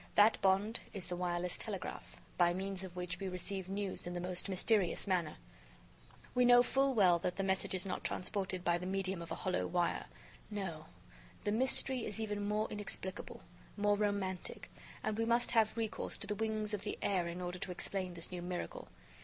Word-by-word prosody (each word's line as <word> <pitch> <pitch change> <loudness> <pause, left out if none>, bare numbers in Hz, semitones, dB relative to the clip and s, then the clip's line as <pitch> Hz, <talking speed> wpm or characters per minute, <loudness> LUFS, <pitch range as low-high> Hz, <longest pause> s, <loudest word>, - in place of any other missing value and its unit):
That 210 +2 +6
bond 195 +4 +3
is 195 -4 -5
the 180 0 -3
wireless 175 0 -1
telegraph, 200 -4 -5 0.2
by 175 -1 +4
means 190 0 -3
of 180 -2 -8
which 180 0 -3
we 195 -1 -2
receive 185 +1 -4
news 195 -2 -2
in 175 - -3
the 175 - -2
most 180 +2 -2
mysterious 195 0 +2
manner. 180 -5 +1 1.0
We 250 - +4
know 245 0 +8
full 270 +1 +2
well 180 -5 +6
that 180 +1 -1
the 195 - -1
message 190 0 +1
is 185 - +2
not 185 - -3
transported 185 -1 -1
by 175 0 +3
the 180 - -4
medium 190 -1 -1
of 170 - -8
a - - 0
hollow 185 -1 0
wire. 175 -1 0 0.4
No, 185 -7 -4 0.6
the 205 - +1
mystery 260 +2 +2
is 210 0 -3
even 205 -2 -2
more 210 +1 +1
inexplicable, 205 -2 -2 0.3
more 205 0 +4
romantic, 200 -3 -2 0.3
and 215 0 -1
we 225 - +2
must 235 +1 +3
have 220 -1 +3
recourse 225 -2 -2
to - - -2
the 210 - -1
wings 215 0 -1
of 205 - -1
the 205 - -3
air 180 -4 +2
in 170 +1 -4
order 180 0 -3
to 185 - -3
explain 185 0 -3
this 170 +1 -4
new 180 -1 -4
miracle. 180 - -4
195 Hz, 195 wpm, -36 LUFS, 180-210 Hz, 1.0 s, know